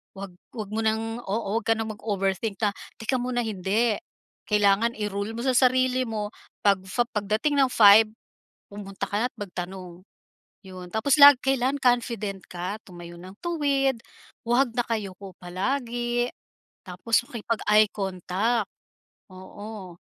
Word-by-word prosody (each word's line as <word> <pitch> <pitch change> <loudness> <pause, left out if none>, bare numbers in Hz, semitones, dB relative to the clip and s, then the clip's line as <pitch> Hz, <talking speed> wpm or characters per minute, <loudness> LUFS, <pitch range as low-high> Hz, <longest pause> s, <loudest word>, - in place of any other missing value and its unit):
Wag 195 -1 -7 0.2
wag 210 -3 -6
mo 220 - -2
ng 225 +1 -1
oo. 210 +1 -1
Wag 230 - -13
ka 225 - +4
ng 220 0 -3
mag-overthink 200 -1 -2
na 205 - +3 0.2
"teka 245 +3 -1
muna," 245 0 -1
hindi. 215 +2 0 0.5
Kailangan 210 +2 +3
i-rule 210 +1 -3
mo 235 - -4
sa 260 - +2
sarili 255 0 +3
mo 210 -2 -4 0.3
pag 200 -2 +4 0.3
pagdating 215 +8 0
ng 270 - +5
5, 215 0 +8 0.6
pumunta 200 -1 -8
ka 205 - -1
na't 255 - -25
magtanong. 180 -2 -7 0.6
Yun 185 -2 -10
tapos 240 +7 +2
lag 285 -1 +11
kailan 270 0 +1
confident 235 -5 +1
ka 185 +3 -4
tumayo 175 -2 -11
ng 185 +2 -11
tuwid, 280 -6 +1 0.5
huwag 245 +2 +3
nakayuko 200 -5 -3
palagi, 240 +5 -2 0.6
tapos 195 +6 0
makipag-eye 215 -2 +2
contact, 195 +3 -1 0.6
oo. 190 0 -9
215 Hz, 130 wpm, -25 LUFS, 195-240 Hz, 0.6 s, lag